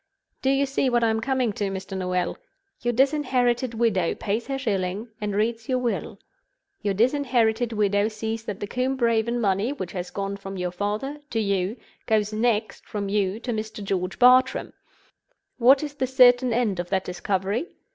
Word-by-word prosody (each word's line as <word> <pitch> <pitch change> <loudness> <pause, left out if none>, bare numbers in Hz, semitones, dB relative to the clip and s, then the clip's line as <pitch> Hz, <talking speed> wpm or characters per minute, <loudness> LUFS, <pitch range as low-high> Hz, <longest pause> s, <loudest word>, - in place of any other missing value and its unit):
Do 265 - +1
you 275 +1 +3
see 270 -1 0
what 240 -1 +2
I 225 - +3
am 220 - 0
coming 255 -3 0
to, 205 - -2
Mr. 195 0 -5
Noel? 180 -1 -1 0.5
Your 240 - +1
disinherited 255 -2 +1
widow 215 -7 +1
pays 215 +3 -2
her 270 -1 -2
shilling, 205 -3 -2
and 205 -1 -2
reads 225 +2 -1
your 255 - +2
will. 245 -2 -2 0.6
Your 200 -2 0
disinherited 240 -1 +2
widow 205 -1 +2
sees 225 +1 -4
that 205 -2 -5
the - - -1
Combe 255 +5 -1
Raven 235 -1 +1
money, 205 +2 +1
which 185 -11 -6
has 180 -1 -5
gone 200 0 -4
from 195 0 -7
your 180 -1 -2
father 210 +10 -3
to 225 - -1
you, 200 +1 0 0.3
goes 215 -1 +1
next 220 -1 0
from 200 -2 -3
you 200 0 0
to 240 0 -3
Mr. 215 -1 -5
George 185 -1 -2
Bartram. 255 +1 +4 0.9
What 265 +4 +6
is 295 -1 -4
the 265 -3 -1
certain 250 -1 +5
end 225 -6 0
of 175 0 -3
that 190 -1 0
discovery? 190 - -2
220 Hz, 175 wpm, -25 LUFS, 200-250 Hz, 0.9 s, What